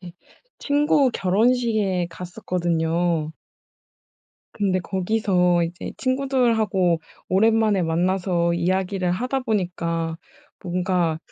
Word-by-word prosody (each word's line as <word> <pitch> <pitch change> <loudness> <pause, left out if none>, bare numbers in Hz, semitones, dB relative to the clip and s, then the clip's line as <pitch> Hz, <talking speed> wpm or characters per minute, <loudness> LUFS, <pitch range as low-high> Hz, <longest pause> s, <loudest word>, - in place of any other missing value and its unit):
이제 175 -2 -10 0.5
친구 290 -2 +2
결혼식에 210 -2 +1
갔었거든요. 170 -2 -1 1.2
근데 195 -3 0
거기서 180 -2 +1
이제 170 +3 -6
친구들하고 235 -10 +1 0.3
오랜만에 215 0 +3
만나서 175 +1 0
이야기를 185 +1 0
하다 250 +8 -1
보니까 175 -7 -2 0.5
뭔가 180 -2 0
185 Hz, 230 characters per minute, -23 LUFS, 175-220 Hz, 1.2 s, 오랜만에